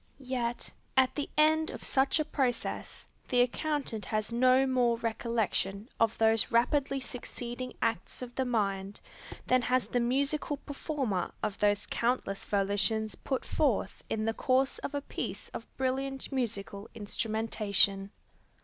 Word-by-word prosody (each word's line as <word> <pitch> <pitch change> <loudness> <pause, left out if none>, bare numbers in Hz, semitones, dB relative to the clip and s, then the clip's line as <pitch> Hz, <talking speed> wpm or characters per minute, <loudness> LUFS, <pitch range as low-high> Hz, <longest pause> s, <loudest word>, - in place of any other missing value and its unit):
Yet, 250 -3 -3 0.3
at 260 -1 +5
the 290 - -3
end 315 +1 +4
of - - -7
such 270 +3 +4
a 310 - +1
process, 260 -6 -2 0.2
the 245 -1 +4
accountant 265 -3 -1
has 215 +1 -1
no 255 +2 +5
more 250 -3 +2
recollection 225 -2 -1
of 225 -1 +2
those 225 -1 +4
rapidly 270 +4 +2
succeeding 245 0 -6
acts 225 +2 -1
of 245 -1 -8
the 265 - 0
mind, 200 -5 -1 0.5
than 255 0 +3
has 250 +1 +2
the 245 - 0
musical 280 +4 0
performer 275 - -3
of 210 -2 -2
those 205 0 +2
countless 230 -5 -1
volitions 205 +2 +1
put 260 +8 -3
forth 275 -9 0
in 215 0 -1
the 225 - +1
course 260 +3 +1
of 285 - -5
a 285 - -1
piece - - -5
of - - -7
brilliant 270 +1 -2
musical 210 -5 -3
instrumentation. 210 -2 +1
240 Hz, 140 wpm, -30 LUFS, 215-265 Hz, 0.5 s, at